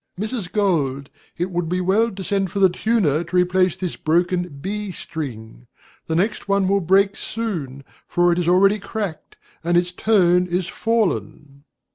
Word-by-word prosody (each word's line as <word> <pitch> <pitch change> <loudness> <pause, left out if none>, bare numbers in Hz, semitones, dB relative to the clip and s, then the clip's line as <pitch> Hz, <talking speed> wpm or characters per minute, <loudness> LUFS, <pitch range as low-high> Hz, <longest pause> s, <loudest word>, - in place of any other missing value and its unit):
Mrs. 215 -3 -4
Gold, 145 -10 0 0.3
it 180 +2 -2
would 175 -2 -2
be 180 +1 0
well 200 +6 +2
to 195 -3 -7
send 195 -1 0
for 200 - -6
the 190 -2 +5
tuner 180 -7 +1
to 170 +2 -7
replace 180 0 +2
this 180 -3 -4
broken 175 +2 0
B 205 +5 -4
string. 110 - -7 0.4
The 160 - -1
next 210 +6 -1
one 200 -1 +2
will 200 +1 +2
break 195 +3 +3
soon, 160 - -4 0.2
for 175 0 +2
it 170 - -1
is 175 - -1
already 195 +4 +4
cracked, 200 -5 -5 0.3
and 175 +1 +2
its 175 0 +1
tone 180 -3 +3
is 180 0 -1
fallen. 155 -11 -2
180 Hz, 165 wpm, -21 LUFS, 170-200 Hz, 0.4 s, the